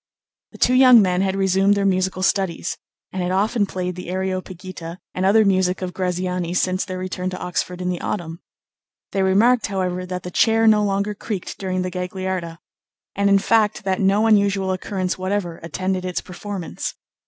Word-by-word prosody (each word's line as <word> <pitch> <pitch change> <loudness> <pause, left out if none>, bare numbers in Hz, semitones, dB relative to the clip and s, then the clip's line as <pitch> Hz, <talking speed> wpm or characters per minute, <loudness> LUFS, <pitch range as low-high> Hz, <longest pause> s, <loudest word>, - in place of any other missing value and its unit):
The - - -13
two 250 - +3
young 255 -2 +8
men 185 -3 +2
had 190 0 0
resumed 195 +1 +3
their 200 0 0
musical 185 -1 0
studies, 190 -3 0 0.4
and 185 - -3
had 180 0 -1
often 205 +2 +1
played 180 -1 -3
the 180 -1 -7
"Areopagita" 185 -2 -5 0.2
and 185 - -1
other 215 +2 +5
music 185 -1 +1
of 180 -1 -4
Graziani 180 -1 -2
since 185 +1 +1
their 185 -2 -5
return 185 0 -3
to 185 - -5
Oxford 180 0 -3
in 180 - -1
the 180 -1 -3
Autumn. 170 -4 -4 0.7
They 195 - 0
remarked, 215 +6 +3
however, 185 -2 -2
that 180 -1 -5
the 180 - -6
chair 225 +3 +3
no 215 -1 +5
longer 200 +1 0
creaked 205 -2 -5
during 185 -1 -2
the 185 - -3
Gagliarda 180 -2 -4 0.6
and, 200 0 +2
in 200 - +6
fact, 215 +1 +2
that 190 0 0
no 200 +3 +3
unusual 200 -3 +3
occurrence 185 0 -2
whatever 185 -3 -2
attended 185 +3 -2
its 180 -1 -2
performance. 185 -1 -6
185 Hz, 175 wpm, -21 LUFS, 180-200 Hz, 0.7 s, young